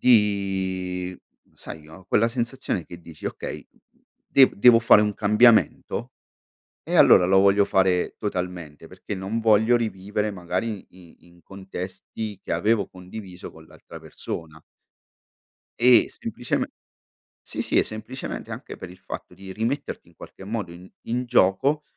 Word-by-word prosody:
di 95 -5 +1 0.3
sai, 80 - -9
no, 80 +4 -14
quella 115 +5 +2
sensazione 120 - -3
che 85 +2 -11
dici: 80 -2 -13
"Okay, - - -6 0.6
dev 135 -1 +5
devo 115 +3 +7
fare 115 -2 +6
un 105 -1 -1
cambiamento 110 +2 +3 0.7
e - - -3
allora 90 - +7
lo 95 +1 +4
voglio 100 +1 +4
fare 95 -2 +1
totalmente, 90 -6 -5
perché 100 - -7
non 95 +4 -3
voglio 110 +1 +4
rivivere, 105 -2 -2
magari, 95 +3 -4
in 90 -2 -17
in 85 0 -22
contesti 95 +2 -7
che - - -6
avevo 100 +4 +1
condiviso 90 0 -10
con 80 0 -16
l'altra - - -13
persona". 80 -1 -8 1.2
E, 125 0 +6
sempliceme - - -3 0.7
sì, - - -5
sì - - -2
e - - +5
semplicemente 110 +4 -7
anche - - -8
per 90 - -9
il 90 - -14
fatto - - -8
di 95 0 -10
rimetterti 115 +8 -3
in - - -23
qualche 95 - -12
modo 105 -4 -4
in 90 +2 -13 0.2
in 125 +2 -1
gioco 125 +8 +2
95 Hz, 140 wpm, -24 LUFS, 90-110 Hz, 1.2 s, devo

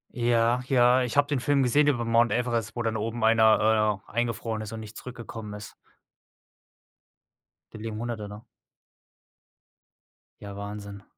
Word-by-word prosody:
Ja, 120 0 +2
ja, 125 -1 +4
ich 125 +1 -2
habe 145 - +5
den 145 -3 -1
Film 140 +2 +2
gesehen 145 +4 +3
über 120 -5 +1
Mount 115 +1 +3
Everest, 120 -3 -1
wo 120 - -2
dann 110 -1 -1
oben 115 +2 -3
einer, 110 -2 +4
äh, - - -15
eingefroren 115 -1 -2
ist 110 -1 -7
und 115 - -6
nicht 110 -1 -10
zurückgekommen 115 -4 -8
ist. 105 +1 -10 2.0
Da 110 - -9
liegen 110 0 -5
100e, 115 -3 -5
ne? 105 +2 -10 2.0
Ja, 100 -1 -8
Wahnsinn. 100 0 -8
115 Hz, 145 wpm, -26 LUFS, 110-120 Hz, 2.0 s, habe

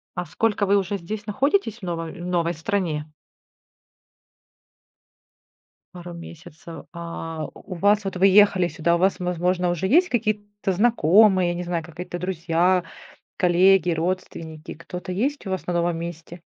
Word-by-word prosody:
А 180 0 -3
сколько 215 0 0
вы 200 +1 +3
уже 200 +1 -1
здесь 210 +4 -6
находитесь, 265 - 0
в - - -22
ново 170 -2 -3
в 175 - -9
новой 175 -1 0
стране? 160 -4 -2 2.8
Пару 175 -1 -9
месяцев. 170 0 -11
А 165 -2 -6
у 185 - -10
вас, 205 +4 +3
вот 190 - -3
вы 195 +2 +5
ехали 195 -2 +5
сюда. 170 0 0
У - - -1
вас, 190 0 +2
возможно, 180 0 0
уже 175 +2 -1
есть 350 - +4
какие-то 205 -3 -2
знакомые, 195 -2 +4
я 175 - -2
не 180 - -4
знаю, 170 -2 -2
какая-то 175 +1 -7
друзья, 180 0 +1 0.5
коллеги, 180 0 +4
родственники. 165 -2 -4
Кто-то 180 +2 -7
есть 265 +5 -2
у - - -3
вас 190 - -3
на 175 - -2
новом 170 -1 0
месте? 170 +1 -8
180 Hz, 150 wpm, -23 LUFS, 170-200 Hz, 2.8 s, вы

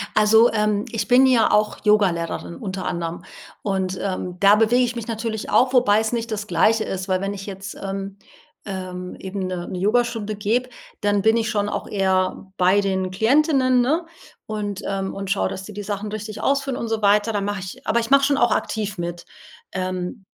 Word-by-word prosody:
Also, 220 +2 +5
ähm, 210 -1 +1
ich 225 - -2
bin 255 +2 +6
ja 250 -4 +4
auch 210 0 +2
Yogalehrerin 185 -6 +1
unter 190 -6 -5
anderem 170 -1 -3 0.4
und, 190 -2 -2
ähm, 185 -2 -3
da 200 +1 +6
bewege 225 +3 +3
ich 245 0 -1
mich 235 -2 -5
natürlich 225 -1 -4
auch, 255 +1 +3
wobei 215 -5 +4
es 220 0 -1
nicht 230 -1 -3
das 210 -1 -3
Gleiche 215 +5 +3
ist. 190 -2 -4
Weil 185 -1 0
wenn 195 +1 -2
ich 195 -1 -7
jetzt, 195 -1 -7
ähm, 195 0 -5 0.5
ähm, 185 -2 -6
eben 190 0 -4
'ne 180 -1 -4
'ne 185 - -5
Yogastunde 215 +1 0
gebe, 225 +5 0 0.3
dann 205 -1 +2
bin 220 +3 +4
ich 225 -1 0
schon 205 -2 0
auch - - -4
eher 190 -1 0
bei 185 +3 +4
den 190 -2 -1
Klientinnen, 255 - +3
ne, 310 +8 +1 0.4
und, 205 -2 -4
ähm 195 -1 -2
und 195 -1 -4
schaue, 195 - +1
dass 190 - -6
die 210 - -9
die 205 +1 -6
Sachen 205 +1 -4
richtig 215 0 -6
ausführen 275 -1 0
und 235 - -3
so 225 -1 -1
weiter. 210 +2 +3
Dann 200 -1 -1
mache 205 -1 -2
ich 185 0 -9
aber 235 - +3
ich 230 - -5
mache 275 0 +5
schon 280 0 +2
auch 240 - +3
aktiv 210 -2 -2
mit, 175 0 -5 0.5
ähm. 185 +2 -4
205 Hz, 200 wpm, -22 LUFS, 190-225 Hz, 0.5 s, bin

